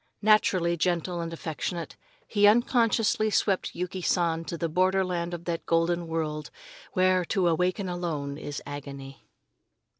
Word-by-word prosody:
Naturally 185 -5 +4
gentle 175 +1 0
and 165 0 -4
affectionate, 165 +1 -4 0.3
he 205 -1 +4
unconsciously 225 -1 +3
swept 200 -2 0
Yuki 180 +1 -4
San 170 -2 +1
to 170 - -4
the 165 - -1
borderland 180 0 +1
of 175 0 -6
that 170 -1 -3
golden 170 +1 +1
world 155 -2 -3 0.4
where 185 -1 +3
to 190 -1 +1
awaken 180 +4 +1
alone 165 -6 -3
is 145 0 -6
agony. 140 -1 -8
175 Hz, 130 wpm, -27 LUFS, 165-185 Hz, 0.4 s, Naturally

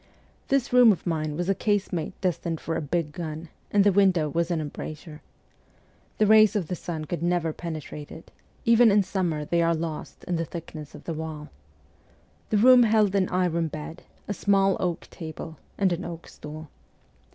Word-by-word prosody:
This 270 -3 0
room 245 -3 +8
of 190 - -3
mine 155 -3 -1
was 175 0 -2
a 195 - +3
casemate 190 -5 -1
destined 170 -3 -1
for 165 - -3
a - - -1
big 155 +1 -2
gun, 160 -1 -6 0.2
and 205 -1 +4
the 205 - +5
window 185 -5 +3
was 170 +3 -1
an 170 -2 0
embrasure. 155 +1 -7 1.0
The 215 - +4
rays 215 0 +6
of 185 -7 -1
the 180 - -1
sun 160 -2 -5
could 170 +3 -4
never 170 -2 0
penetrate 155 -3 -7
it; 160 - -12 0.3
even 235 0 +6
in 205 0 +4
summer 170 -6 -2
they 170 +2 +1
are 165 0 +2
lost 160 -1 -6
in 175 -2 -2
the 165 - -1
thickness 155 -3 -8
of - - -12
the 165 - -4
wall. 155 -1 -6 1.0
The 215 - +2
room 250 +3 +7
held 215 -3 +3
an 195 -2 +2
iron 175 -2 +1
bed, 155 +2 -7 0.3
a 205 - -1
small 195 -1 +2
oak 175 -2 -1
table, 160 -1 -8 0.2
and 190 -3 +2
an 175 +2 -4
oak 170 -1 -7
stool. 155 +1 -10
170 Hz, 185 wpm, -26 LUFS, 160-195 Hz, 1.0 s, room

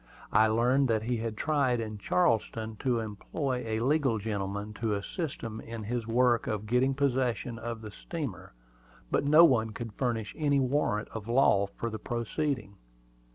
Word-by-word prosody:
I 110 0 +6
learned 125 +5 +3
that 110 -2 +1
he 120 +1 -1
had 110 -1 -4
tried 140 -5 +1
in 110 -2 -5
Charleston 110 +4 +1
to 125 -1 0
employ 125 +5 -3
a 110 0 -1
legal 135 -2 +2
gentleman 100 0 -3
to 110 -3 +1
assist 145 - -4
him 115 -1 -5
in 115 -1 -7
his 115 +1 -3
work 120 0 +3
of 110 -1 -2
getting 125 +4 +2
possession 125 -4 0
of 115 -1 -5
the 110 -1 -8
steamer; 105 - -6 0.6
but - - +1
no 155 +4 +8
one 115 -7 +3
could 115 -1 -6
furnish 115 -4 -2
any 145 -2 +2
warrant 130 -5 0
of 110 -1 -7
law 115 -5 +4
for 115 +3 -5
the 110 - -5
proceeding. 120 -2 -3
115 Hz, 165 wpm, -29 LUFS, 110-130 Hz, 0.6 s, no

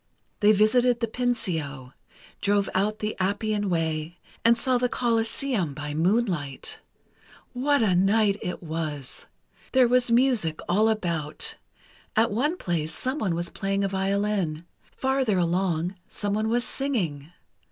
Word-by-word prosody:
They 210 0 +6
visited 240 +4 +3
the 235 - +1
Pincio, 165 - -2 0.5
drove 200 0 +1
out 210 +3 +1
the 215 0 -3
Appian 205 +1 0
way, 160 -1 -1 0.3
and 230 0 +5
saw 250 +1 +2
the 250 0 +1
Coliseum 230 - 0
by 150 0 -5
moonlight. 170 - -1 0.7
What 280 +1 +2
a 200 -4 +3
night 200 +3 +3
it 180 - -5
was! 155 -4 -5 0.5
There 260 -2 +6
was 245 0 +3
music 235 -10 +2
all 210 +5 +3
about—at 180 +4 -2
one 290 - 0
place, 165 - -2
someone 255 - -1
was 170 0 -3
playing 195 0 -1
a - - +2
violin. 195 -4 -1 0.3
Farther 265 -6 0
along, 175 0 0
someone 215 0 -2
was 240 +1 +1
singing. 180 - -3
200 Hz, 125 wpm, -26 LUFS, 170-235 Hz, 0.7 s, They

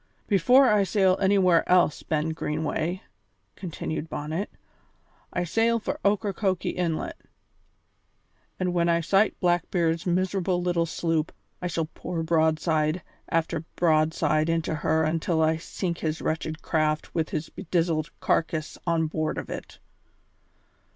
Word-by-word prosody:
Before 245 +7 +5
I 210 -3 +4
sail 190 -1 +3
anywhere 190 -3 +4
else, 180 -4 +4
Ben 155 0 -1
Greenway," 160 +3 -2 0.5
continued 165 -3 -5
Bonnet, 155 +7 -3 0.8
"I 180 - -1
sail 225 +6 +2
for 225 - -4
Ocracoke 200 -2 0
Inlet, 170 -3 -2 1.4
and 180 -1 0
when 170 -1 +2
I 170 0 +3
sight 195 +5 +2
Blackbeard's 175 -1 +1
miserable 185 0 +1
little 175 -1 0
sloop 165 -1 -1 0.3
I 180 - -1
shall 165 -2 -1
pour 165 +1 -5
broadside 160 0 +1 0.3
after 165 -1 0
broadside 155 -1 +2
into 165 -1 0
her 160 +1 +1
until 160 +1 0
I 160 0 +3
sink 170 +1 -4
his 155 -1 -2
wretched 155 0 -3
craft 155 -1 0
with 160 -2 -1
his 155 - -3
bedizened 165 -3 -1
carcass 160 -1 -1
on 165 -1 +2
board 155 0 -2
of - - -5
it." - - -7
165 Hz, 125 wpm, -26 LUFS, 160-180 Hz, 1.4 s, Before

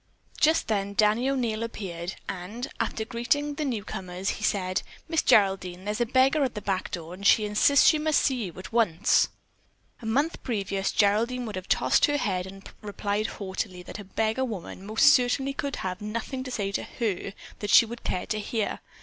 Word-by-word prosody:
Just 315 +2 +3
then 200 -2 -1
Danny 215 +5 +3
O'Neil 235 -5 -1
appeared, 190 -6 -5
and, 195 +6 -5
after - - -2
having 220 - -14
greeted 285 +5 0
the 310 - -1
newcomers, 195 -6 -3
she - - -10
said: 185 -3 0 0.3
"Miss 325 -1 +1
Geraldine, 190 -3 +2
there's 210 +3 -2
a 240 - +2
beggar 265 +4 +3
at 255 -4 -1
the - - -2
back 190 -2 -2
door 170 -1 -6
and 190 +2 -10
she 215 - +5
insists 210 +7 +4
that - - +9
she 310 - 0
must 310 -1 +2
see 255 -5 0
you 175 - -7
at 185 - -9
once." 210 -4 +3 0.7
A 225 - -6
month 285 +9 0
previous 195 -4 -2
Geraldine 230 +5 +2
would 215 -3 -5
have 185 0 -6
tossed - - +4
her 290 -1 +1
head 185 -8 -1
and 195 +1 -11
replied 205 0 -2
haughtily 190 -2 -4
that 190 - -8
a - - -7
beggar 220 +5 -1
woman 200 -4 -6
most 220 +1 +3
certainly 265 +2 +1
could 280 0 -3
have 185 +1 -4
nothing 230 +5 -4
to - - -5
say 200 -5 -2
to - - -1
her 200 -4 -3 0.3
that 205 - -4
she 230 - +8
would 235 +1 -9
care 180 - -2
to 215 - -2
hear. 215 0 -2
215 Hz, 200 wpm, -27 LUFS, 195-245 Hz, 0.7 s, that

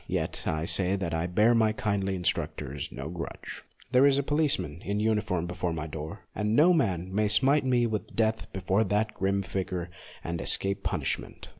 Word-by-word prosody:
Yet - - -2
I 80 +1 -1
say 95 +2 +1
that 90 -4 -3
I 80 +1 0
bear 105 +6 +4
my 110 -2 +3
kindly 100 -3 -1
instructors 75 -5 -2
no 70 +2 -6
grudge. 85 0 -7 0.3
There 130 +2 +6
is 140 -1 +4
a 140 - +1
policeman 145 - 0
in 100 +1 -1
uniform 105 -5 0
before 90 -1 -2
my 75 -1 -4
door, 80 +5 -7
and 105 +1 0
no 165 +6 +6
man 95 - 0
may 105 +1 +2
smite 135 +7 +4
me 125 -2 +3
with 110 -4 -3
death 110 -1 0
before 95 +2 +1
that 105 +2 0
grim 100 0 0
figure 90 -2 -3 0.3
and 85 0 -3
escape 100 0 +1
punishment. - - -3
100 Hz, 180 wpm, -28 LUFS, 90-110 Hz, 0.3 s, There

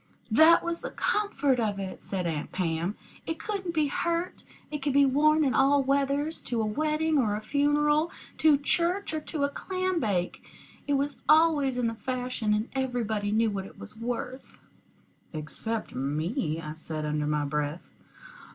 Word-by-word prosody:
"That 315 +8 +7
was 340 0 -2
the - - -4
comfort 290 -11 +1
of 210 -3 0
it," 190 -1 -6
said 185 -2 -3
Aunt 155 -3 -3
Pam. 170 +2 -1 0.3
"It 325 - -2
couldn't 375 -2 -4
be 310 -1 +3
hurt. 340 +4 -2 0.3
It 295 -2 -4
could 280 -1 0
be 280 0 +6
worn 305 +3 +4
in 265 - +1
all 275 +1 +4
weathers 280 +3 0
to 235 - -1
a 220 - +1
wedding 305 +6 +1
or 210 -5 +1
a - - -2
funeral, 295 +5 +2 0.3
to 310 -2 +6
church 340 +5 +1
or 310 - 0
to 300 -1 -3
a 280 - +2
clam 370 +3 -2
bake. 190 - -1 0.4
It 285 - +1
was 280 +1 -1
always 305 -5 +4
in 245 - 0
the 230 - 0
fashion, 250 -2 -2
and 210 +2 0
everybody 235 -6 -1
knew 220 0 +2
what 195 -1 -4
it - - -16
was - - -10
worth." 245 +3 -5 0.8
"Except 185 +9 -4
me," 155 - -2
I 155 -2 -6
said, 155 -1 -5
under 150 0 -1
my 150 -1 0
breath. 150 +3 -3
260 Hz, 170 wpm, -28 LUFS, 205-305 Hz, 0.8 s, That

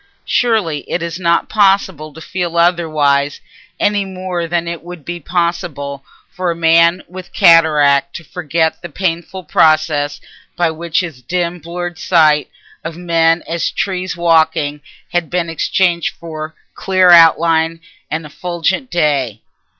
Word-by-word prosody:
Surely 215 -11 +1
it 175 - -2
is 170 +1 -5
not 170 -1 +1
possible 195 -7 +1
to 155 - -13
feel 175 -1 -4
otherwise, 155 -5 +1 0.4
any 205 -1 +1
more 185 -2 -4
than 170 0 -1
it 170 -1 -5
would 175 -3 -11
be 175 0 -5
possible 170 -5 -3 0.2
for 180 -1 -4
a 170 - -1
man 170 +2 +3
with 185 0 -10
cataract 145 -4 +4
to 170 - -8
regret 160 -2 -1
the 175 - -8
painful 180 +2 -3
process 150 -2 +2 0.4
by 170 -2 +1
which 165 +1 -1
his 160 -8 -7
dim 175 +5 -2
blurred 175 +1 -6
sight 155 -4 +3 0.3
of 165 0 -6
men 165 -1 +1
as 165 -1 -1
trees 185 -2 -3
walking 160 -3 +1 0.3
had 175 -2 -1
been 170 -2 -2
exchanged 170 +1 0
for 160 -1 -8 0.2
clear 185 -1 +3
outline 165 -1 +5 0.3
and 155 0 -3
effulgent 175 - -3
day. 140 - 0
170 Hz, 135 wpm, -16 LUFS, 155-175 Hz, 0.4 s, outline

